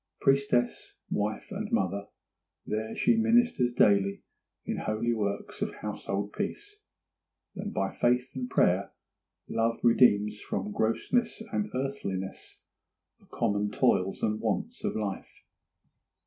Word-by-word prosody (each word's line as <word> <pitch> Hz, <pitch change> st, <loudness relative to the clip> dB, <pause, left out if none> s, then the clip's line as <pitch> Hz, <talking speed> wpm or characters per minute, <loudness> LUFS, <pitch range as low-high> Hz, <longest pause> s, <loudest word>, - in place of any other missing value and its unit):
Priestess, 135 Hz, -3 st, +1 dB
wife, 105 Hz, -, -2 dB
and 210 Hz, +3 st, -4 dB
mother, 100 Hz, -, 0 dB, 0.6 s
there 110 Hz, +1 st, -3 dB
she 235 Hz, -, +3 dB
ministers 230 Hz, -, +3 dB
daily 100 Hz, -4 st, +3 dB, 0.4 s
in -, -, -2 dB
holy 110 Hz, +2 st, 0 dB
works 100 Hz, -2 st, -3 dB
of -, -, -2 dB
household 100 Hz, +1 st, -4 dB
peace, 415 Hz, 0 st, -4 dB, 0.8 s
and 205 Hz, +2 st, -4 dB
by 95 Hz, 0 st, -1 dB
faith 125 Hz, +1 st, +1 dB
and 125 Hz, -1 st, -4 dB
prayer 95 Hz, -4 st, +2 dB, 0.5 s
and -, -, -5 dB
love 115 Hz, +1 st, +1 dB
redeems 105 Hz, -3 st, +4 dB
from 100 Hz, +2 st, -3 dB
grossness 170 Hz, -, 0 dB
and 210 Hz, 0 st, -1 dB
earthliness 100 Hz, -8 st, -4 dB, 0.6 s
the -, -, -24 dB
common 105 Hz, -2 st, 0 dB
toils 95 Hz, -6 st, +1 dB
and 105 Hz, 0 st, +1 dB
wants -, -, -2 dB
of -, -, -1 dB
life. 105 Hz, -3 st, -5 dB
115 Hz, 120 wpm, -29 LUFS, 100-135 Hz, 0.8 s, redeems